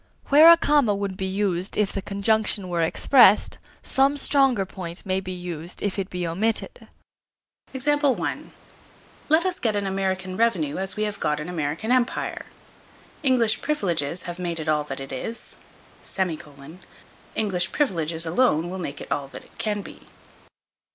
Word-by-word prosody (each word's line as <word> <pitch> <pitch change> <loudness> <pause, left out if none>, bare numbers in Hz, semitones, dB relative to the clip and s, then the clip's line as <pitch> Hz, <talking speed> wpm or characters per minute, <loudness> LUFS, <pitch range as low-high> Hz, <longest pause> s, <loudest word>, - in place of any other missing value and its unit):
Where 305 +3 +9
a 335 - +9
comma 285 -10 +3
would 200 -1 -3
be 190 0 -3
used 190 -2 -1
if 210 -2 +1
the 195 - -3
conjunction 200 -1 -1
were 170 -1 0
expressed, 210 +5 +4 0.2
some 275 +2 +2
stronger 270 -8 +3
point 180 -1 -8
may 190 -1 0
be 185 -1 -6
used 175 -2 -6
if 205 -1 -1
it 190 0 -3
be 180 -1 -3
omitted. 210 +7 -2 0.8
Let 290 +3 -2
us 370 -1 -1
get 220 -3 0
an 205 -1 -1
American 190 -1 -2
revenue 185 -11 +1
as 190 0 -3
we 215 - -1
have 205 -1 -3
got 150 0 0
an 150 +3 -6
American 165 +6 -2
Empire. 250 -1 0 0.7
English 240 -6 +3
privileges 180 - -1
have 175 0 -7
made 170 -2 -3
it 160 - -5
all 150 -1 +2
that - - -6
it 135 0 -7
is; 225 - -5 1.8
English 190 -5 0
privileges 165 - -1
alone 170 -3 +2
will 190 - -5
make 145 -5 -5
it - - -10
all 140 -1 -1
that - - -11
it - - -24
can 210 -2 -2
be. - - -13
195 Hz, 155 wpm, -24 LUFS, 175-230 Hz, 1.8 s, Where